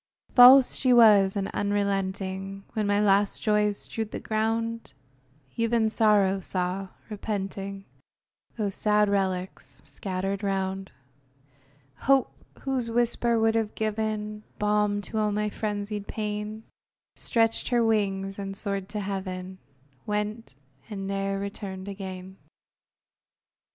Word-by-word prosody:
False 255 +1 +9
she 255 - +1
was, 210 -5 +6
and 195 -1 -1
unrelenting; 195 -1 -2
When 215 -2 -1
my 205 0 +2
last 200 -1 +3
joys 210 -1 +2
strewed 220 -1 -4
the - - -5
ground, 225 +1 -2 0.6
Even 230 -1 +1
Sorrow 205 -4 +3
saw, 185 +1 0 0.2
repenting, 195 -1 -4 0.7
Those 205 -3 -1
sad 210 +1 +2
relics 190 -2 -2
scattered 195 +1 -3
round; 190 -1 -2 1.1
Hope, 275 -1 +2 0.3
whose 260 -4 -2
whisper 235 0 +1
would 225 0 +3
have 225 -2 -1
given 215 -1 -2 0.2
Balm 210 0 +1
to 220 - -3
all 210 -1 +1
my 210 0 -1
frenzied 205 -1 -4
pain, 210 0 -4 0.5
Stretched 225 -2 +1
her 240 -2 +2
wings, 195 -3 0
and 195 0 -5
soared 200 -2 -2
to 210 - -3
heaven, 190 -1 -5 0.5
Went, 210 - -3 0.3
and 195 -3 -5
ne'er 195 0 -2
returned 195 -1 -6
again! 190 -1 -7
205 Hz, 115 wpm, -27 LUFS, 195-220 Hz, 1.1 s, False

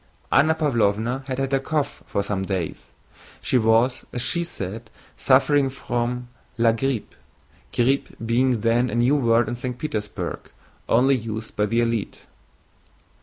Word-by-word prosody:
Anna 160 +2 +4
Pávlovna 120 -4 +1
had 130 -1 -3
had 135 0 -1
a 135 - +4
cough 150 +1 -2
for 100 - -1
some 100 -1 -2
days. 95 -4 -4 0.5
She 125 - +1
was, 115 +3 +3
as 120 - -3
she 170 +6 0
said, 110 - -6 0.3
suffering 140 +1 +3
from 125 -1 -3 0.3
la 115 0 +4
grippe; 115 -1 -2 0.6
grippe 130 +3 +1
being 120 0 +2
then 120 +2 +2
a 110 - -3
new 120 +4 +3
word 115 -4 +3
in 120 - -2
St. 125 0 -5
Petersburg, 110 -8 -4
used - - -24 0.4
only 115 -3 +2
by 105 0 +1
the 115 +3 +1
elite. 115 -3 -2
120 Hz, 145 wpm, -23 LUFS, 115-135 Hz, 0.6 s, Anna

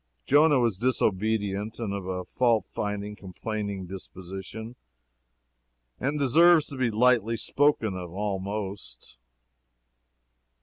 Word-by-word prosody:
Jonah 145 +1 +5
was 115 -6 +1
disobedient, 110 -3 0
and 110 -4 -3
of 100 -2 -5
a 90 -1 -3
fault 115 -6 +2
finding, 105 0 -3
complaining 100 0 -5
disposition, 95 +5 -8 1.2
and 145 +3 -1
deserves 155 +4 +5
to 140 - -6
be 130 -2 +1
lightly 115 0 +3
spoken 140 -6 +1
of, 90 -2 -6
almost. 100 - -5
105 Hz, 100 wpm, -27 LUFS, 95-120 Hz, 1.2 s, Jonah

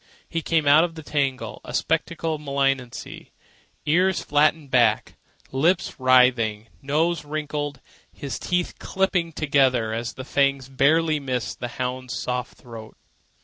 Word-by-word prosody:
He 165 - -3
came 160 -2 +1
out 145 +3 +6
of 170 -1 -3
the 160 - -9
tangle 140 -3 -2
a - - -6
spectacle 165 0 -1
of 150 - -5
malignancy, 135 -4 -2 0.6
ears 180 +4 +2
flattened 150 -1 +2
back, 120 -4 +3 0.4
lips 170 +7 +1
writhing, 125 -4 +3
nose 155 +4 0
wrinkling, 150 -1 -3 0.4
his 140 - -6
teeth 180 -1 -2
clipping 185 -3 0
together 130 -7 +2
as 115 +1 -3
the 130 - -8
fangs 140 -2 +1
barely 155 +4 +2
missed 130 -4 -3
the 120 - -3
hound's 125 0 -3
soft 125 0 -4
throat. 115 -3 -11
140 Hz, 135 wpm, -24 LUFS, 125-160 Hz, 0.6 s, out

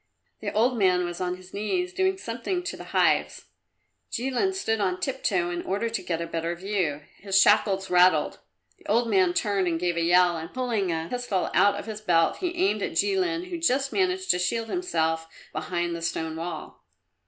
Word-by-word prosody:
The - - -3
old 235 +3 +2
man 180 -2 +3
was 175 0 -5
on 180 0 -2
his 185 0 -16
knees, 360 - -2
doing 380 0 +1
something 355 +6 -3
to 355 - -4
the - - -10
hives. - - +1 0.7
Jilin 265 +10 0
stood 225 - -1
on 185 -2 0
tiptoe 190 -8 -1
in 175 0 -3
order 205 +5 -2
to 230 - -2
get 165 -2 -2
a 170 - -2
better 165 +1 -3
view; 175 -6 -2 0.2
his 195 -1 +2
shackles 195 -2 +3
rattled. 180 -3 +4 0.4
The - - -16
old 230 +3 +2
man 185 -5 +3
turned 200 -3 +1
and 165 -1 0
gave 175 -1 -1
a - - +1
yell 175 0 +4
and 160 +1 -7
pulling 230 -8 -1
a 160 0 -2
pistol 245 -7 -1
out 200 +2 +4
of 205 - -6
his 215 -1 -6
belt 165 -5 +2
he 355 -2 -3
aimed 380 +3 +1
at - - -2
Jilin, 365 -3 0
who 345 - -3
just 275 -4 +1
managed 375 -1 +1
to 180 - 0
shield 225 +5 -1
himself 165 - -1 0.3
behind 170 +2 -2
the 170 - -6
stone 160 -1 -2
wall. 170 +2 -6
195 Hz, 195 wpm, -26 LUFS, 175-255 Hz, 0.7 s, rattled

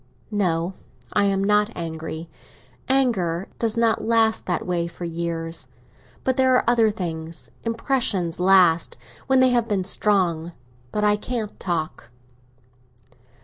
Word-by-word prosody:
"No, 180 -3 0 0.4
I 205 - +3
am 195 -1 +1
not 210 +1 +3
angry. 160 0 -5 0.6
Anger 195 -10 +1
does 230 -1 0
not 230 -1 +2
last, 225 -1 +2
that 175 - -1
way, 175 -2 -1
for 175 +1 -7
years. 165 0 -4 0.6
But 260 0 0
there 260 -1 +4
are - - +3
other 235 -2 +4
things. 165 -5 -5
Impressions 230 - 0
last, 180 -3 +4 0.3
when 265 -1 +4
they 260 - +6
have 240 -2 +2
been 200 -4 0
strong. 180 -4 +1 0.4
But 210 - -1
I 210 0 +4
can't 220 -1 -4
talk." 160 -8 -3
195 Hz, 130 wpm, -23 LUFS, 170-225 Hz, 0.6 s, they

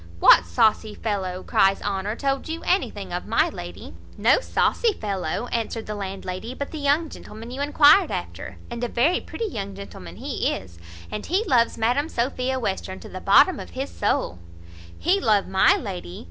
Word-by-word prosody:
"What 85 - +7
saucy 210 - +2
fellow," 190 -4 -3
cries 195 0 +3
Honour, 200 +1 -2
"told 275 +3 -2
you 325 +1 -4
anything 375 +2 -1
of - - -4
my - - +2
lady?" - - -9 0.2
"No - - +4
saucy 470 -2 +1
fellow," 200 - -3
answered 230 -1 -2
the 210 - -4
landlady, 195 +3 -5
"but 280 - -5
the 315 - -6
young 290 +3 +2
gentleman 225 -4 -10
you 265 +2 -5
enquired 295 +5 +6
after, - - -6
and 235 0 -5
a - - +1
very 280 +10 +2
pretty 460 - -5
young 200 - -5
gentleman 90 - -10
he - - -2
is, 85 -2 -9 0.3
and 210 - -5
he 375 +6 +1
loves 240 - +2
Madam 245 +7 +1
Sophia 255 +1 -1
Western 190 -4 -3
to - - -11
the 185 - -7
bottom 280 - +5
of - - -8
his 270 +2 -3
soul." 90 - -1 0.6
"He 370 +4 +2
love 210 -3 +3
my 190 - +4
lady! 185 - -6
225 Hz, 175 wpm, -24 LUFS, 195-280 Hz, 0.6 s, What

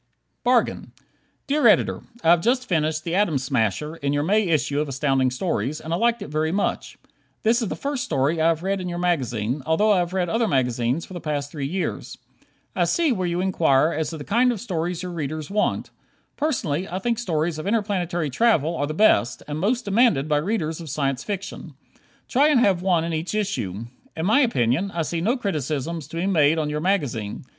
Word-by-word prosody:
"Bargain" 245 -1 +1 0.5
Dear 295 +1 +3
Editor: - - +3 0.2
I 165 - +5
have 170 -1 +5
just 250 +4 +1
finished 155 -2 0
"The 170 - -3
Atom 185 -6 +2
Smasher," 130 - -1
in 140 -2 -1
your 145 0 +1
May 210 +6 +2
issue 145 -3 +1
of 150 - -3
Astounding 135 -1 +1
Stories, 135 - -2
and 160 - -5
liked 230 +3 +1
it - - -9
very 155 +1 0
much. 200 +3 -2 0.5
This 235 +2 +3
is 225 - -1
the - - -3
first 280 -1 -3
story 145 - 0
that - - 0
I - - +5
have 165 0 +1
read 195 0 -1
in 180 - -4
your 175 - -4
magazine, 130 -8 -1
although 185 +9 +2
I 195 - +4
have 175 0 -1
read 185 -2 0
other 225 +5 +1
magazines 125 - 0
for - - -12
the 175 - -6
past 145 -2 -3
three 140 -3 -3
years. 180 +5 -4 0.6
I - - +2
see 335 -5 +2
where 185 -6 -1
you 175 +1 -1
inquire 165 -5 +3
as 155 -1 -2
to 160 - -6
the 145 - -7
kind 245 - +3
of 230 - -4
stories 175 -4 -3
your 180 - -5
readers 155 -1 -4
want. 210 +1 0 0.4
Personally, 190 - -1
I 180 - -3
think 235 +3 -1
stories 165 -6 -1
of 155 - -5
interplanetary 185 -8 -1
travel 170 - +2
are 145 - -1
the 155 - -4
best, 120 - +3
and 150 0 -4
most 235 +8 0
demanded 200 - +3
by 150 -1 +2
readers 165 -1 -2
of 160 - -8
Science 135 -1 -1
Fiction. 195 -6 -6 0.5
Try 280 +4 +3
and 295 -5 +4
have 195 -6 +3
one 180 -3 +2
in 165 0 -3
each 160 +6 -3
issue. 115 - -2 0.3
In 160 - -1
my 220 +8 +4
opinion, 185 - +1
I 170 -4 -2
see 165 +1 -3
no 235 +9 +1
criticisms 155 - -3
to 165 - -8
be 170 - -1
made 160 -5 +3
on 150 -2 -1
your 150 0 -2
magazine. 140 - -1
165 Hz, 210 wpm, -23 LUFS, 150-200 Hz, 0.6 s, I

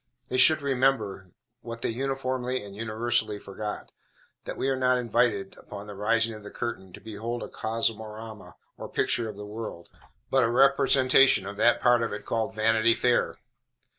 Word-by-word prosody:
They 130 - -1
should 155 +3 +6
remember, 125 -9 0 0.3
what 115 -1 -8
they - - 0
uniformly 130 0 -2
and 100 -1 -10
universally 110 -1 0
forget, 105 +1 -7 0.5
that - - -6
we - - -1
are 135 - +1
not 130 -1 +2
invited, 120 -5 0
upon 100 0 -9
the 105 - -8
rising 115 +3 +1
of 110 - -9
the 105 - -9
curtain, 100 -6 -5
to - - -10
behold 115 +2 -5
a - - -6
cosmorama, 110 -1 -4 0.2
or - - -7
picture 115 -2 0
of 105 - -8
the 105 +1 -8
world, 105 -5 -7 0.4
but 135 -1 +4
a 115 - +2
representation 135 -2 +4
of 100 +1 -7
that 120 +2 +4
part 120 -1 +4
of 115 - -1
it 105 - -7
called 115 -1 -2
Vanity 115 +1 +3
Fair. 125 -1 +1
115 Hz, 170 wpm, -27 LUFS, 105-125 Hz, 0.5 s, should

